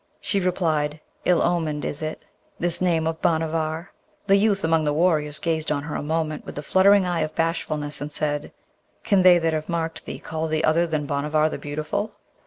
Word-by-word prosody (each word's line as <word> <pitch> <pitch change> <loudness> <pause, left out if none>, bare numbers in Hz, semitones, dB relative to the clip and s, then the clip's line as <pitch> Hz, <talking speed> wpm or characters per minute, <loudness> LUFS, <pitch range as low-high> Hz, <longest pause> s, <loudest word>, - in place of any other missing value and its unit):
She 200 - 0
replied, 160 -5 0 0.3
'Ill 180 -2 +4
omened 160 -4 0
is 145 - -4
it, 155 0 -4 0.4
this 175 0 -1
name 170 -3 +2
of 160 0 -2
Bhanavar!' 160 +2 0 0.3
The 195 -1 +5
youth 200 -1 +2
among 160 -2 +2
warriors 155 -2 +1
gazed 160 -1 -1
on 140 -2 0
her 150 - -5
a - - -2
moment 155 0 -2
with - - -9
the 145 - -5
fluttering 195 +3 +5
eye 175 -2 0
of 155 0 -2
bashfulness, 155 -3 -1
and 145 +1 -4
said, 145 0 -2 0.5
'Can 200 -3 +3
they 180 -1 +7
that 165 -1 0
have 155 +1 -3
marked 165 -1 -3
thee - - -5
call 160 0 -4
thee 155 0 0
other 165 +2 +3
than 155 -2 -1
Bhanavar 150 +2 +1
the - - -5
Beautiful?' 155 +9 -3
160 Hz, 195 wpm, -24 LUFS, 150-175 Hz, 0.5 s, they